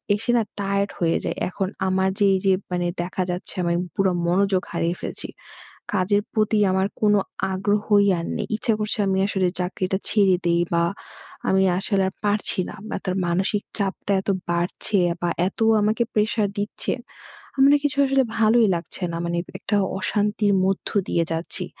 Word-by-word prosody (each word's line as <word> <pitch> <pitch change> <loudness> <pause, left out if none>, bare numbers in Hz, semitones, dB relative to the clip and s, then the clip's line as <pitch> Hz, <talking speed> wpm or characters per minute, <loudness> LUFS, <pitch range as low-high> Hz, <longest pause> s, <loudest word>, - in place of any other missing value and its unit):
এসে 225 +3 -1
না 225 - +3 0.2
টায়ারড 200 0 0
হয়ে 165 -1 +2
যাই। - - -2
এখন 190 +1 -2 0.2
আমার 190 0 +2
যে 205 - +4
এই - - 0
যে 190 - +5 0.2
মানে 175 -1 0
দেখা 185 +1 -2
যাচ্ছে 180 - -5
আমি 170 0 +1 0.2
পুরা 195 -1 +2 0.2
মনোযোগ 190 +1 +2
হারিয়ে 170 0 -1
ফেলছি। - - -5 0.7
কাজের 205 +2 +2
প্রতি 215 -1 +2
আমার 190 +1 +2
কোনো 210 -1 +4 0.3
আগ্রহই 205 +1 +2
আর 165 - -4
নেই। - - -3
ইচ্ছে 225 +1 +1
করছে 215 +1 -2
আমি 190 0 +1
আসলে 190 -2 +1
চাকরিটা 185 +1 -1
ছেড়ে 200 -3 +4
দেই 170 0 +3
বা 170 0 +3 0.7
আমি 190 0 +4 0.2
আসলে 195 0 +1
আর - - -17
পারছি 205 -2 0
না - - -8
বা - - -3
তার 185 -1 -1
মানসিক 190 +4 0 0.2
চাপটা 200 0 -2
এত - - -5 0.2
বাড়ছে 175 +4 0
এ - - 0
বা 175 - +1 0.2
এত 195 - -8 0.2
আমাকে 215 +3 +2
প্রেশার 215 0 +1
দিচ্ছে। 205 +1 -3 0.6
আমার 270 0 +5
না 290 - +6
কিছু 285 -1 0
আসলে 270 0 +3
ভালোই 225 +1 +4
লাগছে 170 +2 -6
না। 165 - -3
মানে 170 0 -1 0.2
একটা 205 +1 0 0.2
অশান্তির 205 +1 +1
মধ্য 195 0 -1 0.2
দিয়ে 170 - +1
যাচ্ছি। 170 +3 -3
195 Hz, 175 wpm, -23 LUFS, 185-210 Hz, 0.7 s, না